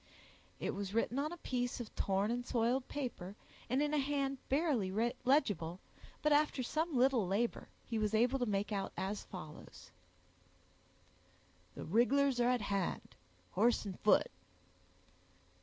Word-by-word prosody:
It - - -2
was 200 +1 -4
written 235 +3 +1
on 300 +3 -1
a 345 - -6
piece 245 -5 -2
of 235 -3 -7
torn 195 +3 +1
and 245 +1 -1
soiled 245 +2 0
paper, 235 -9 -5 0.3
and 260 +4 +2
in 295 0 -1
a 300 - +3
hand 275 -1 -1
barely 275 - +1 0.4
legible, 200 - +2 0.4
but 300 - +3
after 295 -3 +3
some 315 +3 -1
little 250 -5 +3
labor, 215 +6 -1 0.2
he 225 -2 -2
was 215 0 +1
able 245 +4 +3
to 245 - 0
make 205 +1 -1
out 195 -2 -2
as 200 +2 -3
follows— 155 -5 -10 1.9
"_The - - -5
rig'lars 245 - +3
are 240 0 +4
at 250 -2 +2
hand, 200 -3 -2 0.4
horse 225 +3 +2
and 190 -3 -6
foot. 210 - +4
240 Hz, 145 wpm, -35 LUFS, 205-275 Hz, 1.9 s, are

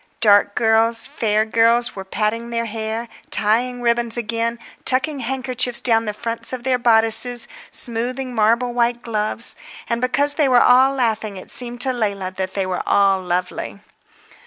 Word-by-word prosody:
Dark 205 -2 +4
girls, 225 0 +2
fair 215 -1 0
girls 230 +2 +2
were 195 - -6
patting 215 +4 -2
their 230 0 -2
hair, 225 +1 -4 0.2
tying 245 +4 +1
ribbons 235 0 0
again, 230 +1 -2 0.3
tucking 270 +3 +2
handkerchiefs 255 -1 -1
down 225 -2 +2
the 210 - -2
fronts 230 0 -3
of 255 -2 -5
their 255 -1 +1
bodices, 230 +1 +3 0.2
smoothing 250 +2 -1
marble 235 +2 +1
white 240 0 0
gloves. 215 +1 -1 0.3
And 235 0 -2
because 280 +3 +1
they 290 -1 +2
were 250 - +4
all 260 +3 +5
laughing 220 -5 -1
it 185 - -11
seemed 245 -1 -5
to 260 0 +1
Leila 200 -5 -2
that 190 0 -4
they 195 -1 -1
were 185 -1 -3
all 195 -1 +3
lovely. 180 +2 -3
230 Hz, 160 wpm, -20 LUFS, 215-245 Hz, 0.3 s, all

